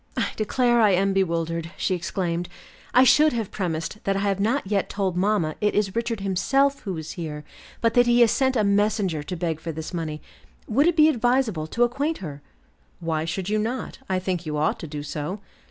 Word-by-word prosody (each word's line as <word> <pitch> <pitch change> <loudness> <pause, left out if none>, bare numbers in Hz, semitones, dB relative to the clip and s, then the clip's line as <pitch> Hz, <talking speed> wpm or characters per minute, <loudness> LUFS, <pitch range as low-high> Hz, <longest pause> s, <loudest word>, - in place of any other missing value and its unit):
"I - - +1
declare 240 +2 +2
I 210 -3 +5
am 195 +2 +2
bewildered," 165 -3 -1
she 190 - 0
exclaimed. 175 -1 -2 0.4
"I 255 - +6
should 300 +3 +5
have 225 -4 -3
premised 165 +1 -3
that 195 - +1
I 195 - 0
have 200 -1 0
not 230 +6 +1
yet 195 0 0
told 195 -3 -1
mamma 185 -4 +1
it 210 0 +1
is 205 -1 0
Richard 230 -2 -2
himself 270 +9 +1
who 190 -5 -5
is 155 0 -6
here, 150 -4 -6 0.4
but 230 -1 +2
that 245 0 +4
he 240 0 +4
has 230 -2 +6
sent 265 -1 +1
a 220 - +2
messenger 200 -5 +1
to 180 +5 -5
beg 165 -2 -2
for 165 - -5
this 160 +2 -7
money. 160 -3 -3 0.5
Would 275 +8 +3
it 345 - +3
be 305 0 +7
advisable 240 - +1
to 235 +9 +1
acquaint 280 +7 0
her?" 145 -6 -8 0.6
"Why 160 -1 -1
should 180 +3 -3
you 215 +1 +1
not? 235 +4 -3
I 190 - +1
think 185 -2 -2
you 150 -2 -3
ought 150 - 0
to 165 - -6
do 145 -1 -6
so." 150 +6 -4
195 Hz, 210 wpm, -24 LUFS, 165-230 Hz, 0.6 s, be